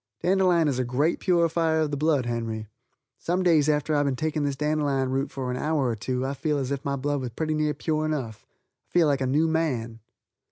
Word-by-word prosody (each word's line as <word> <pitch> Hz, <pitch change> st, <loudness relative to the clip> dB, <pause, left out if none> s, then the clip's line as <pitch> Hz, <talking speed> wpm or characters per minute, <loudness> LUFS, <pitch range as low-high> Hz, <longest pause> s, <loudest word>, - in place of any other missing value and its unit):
Dandelion 180 Hz, -3 st, +3 dB
is 135 Hz, -3 st, 0 dB
a -, -, +2 dB
great 135 Hz, +7 st, 0 dB
purifier 165 Hz, -2 st, +2 dB
of 155 Hz, -2 st, 0 dB
the -, -, -1 dB
blood, 145 Hz, -3 st, +1 dB
Henry. 115 Hz, -2 st, -3 dB, 0.5 s
Some 180 Hz, +2 st, -1 dB
days 155 Hz, -4 st, +4 dB
after 150 Hz, +1 st, +1 dB
I've 145 Hz, -1 st, +2 dB
been 135 Hz, -, 0 dB
taking 155 Hz, +2 st, -1 dB
this 140 Hz, -1 st, -1 dB
dandelion 145 Hz, -3 st, 0 dB
root 135 Hz, +2 st, -1 dB
for 130 Hz, -2 st, -4 dB
an 125 Hz, -, -3 dB
hour 150 Hz, -2 st, 0 dB
or 115 Hz, -, -1 dB
two 125 Hz, +5 st, -2 dB
I 135 Hz, -, -2 dB
feel 150 Hz, +2 st, -1 dB
as 135 Hz, -1 st, -2 dB
if 140 Hz, 0 st, -3 dB
my 140 Hz, 0 st, -1 dB
blood 145 Hz, +1 st, -1 dB
was 125 Hz, -, -3 dB
pretty 155 Hz, +6 st, -2 dB
near 150 Hz, -1 st, 0 dB
pure 155 Hz, -1 st, -1 dB
enough. 130 Hz, -9 st, -4 dB, 0.4 s
I -, -, -36 dB
feel 175 Hz, -2 st, +5 dB
like 140 Hz, -2 st, +1 dB
a 130 Hz, -, +1 dB
new 150 Hz, +5 st, +2 dB
man. 130 Hz, -9 st, -1 dB
145 Hz, 230 wpm, -26 LUFS, 130-160 Hz, 0.5 s, feel